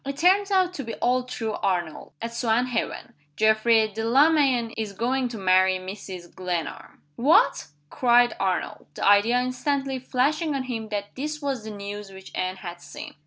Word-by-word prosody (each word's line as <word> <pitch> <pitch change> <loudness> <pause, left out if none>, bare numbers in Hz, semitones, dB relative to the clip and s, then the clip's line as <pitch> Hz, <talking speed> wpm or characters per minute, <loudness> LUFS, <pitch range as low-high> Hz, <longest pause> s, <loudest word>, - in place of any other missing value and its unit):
"It 275 0 -5
turns 385 +5 +4
out 370 -2 +2
to 285 - -5
be 230 -1 -6
all 250 +1 +1
true, 225 -3 -4
Arnold, 175 -4 -2
at 230 - -3
Swanhaven. 235 +1 -1 0.2
Geoffrey 220 +2 +4
Delamayn 245 +2 +2
is 215 -2 -4
going 250 +5 0
to 235 -2 -7
marry 185 -1 +3
Mrs. 185 -2 -8
Glenarm." 180 -3 -5
"What!" 280 +7 +3 0.2
cried 245 -1 +4
Arnold; 190 -1 -2
the - - -1
idea 205 +5 +5
instantly 265 +1 -1
flashing 285 +5 0
on 270 - -1
him 225 -4 -5
that 205 -1 -4
this 300 +3 -4
was 270 -6 -3
the - - -5
news 205 0 -7
which 190 0 -12
Anne 185 0 -2
had 175 -2 -8
seen. - - -9
230 Hz, 165 wpm, -25 LUFS, 200-265 Hz, 0.2 s, idea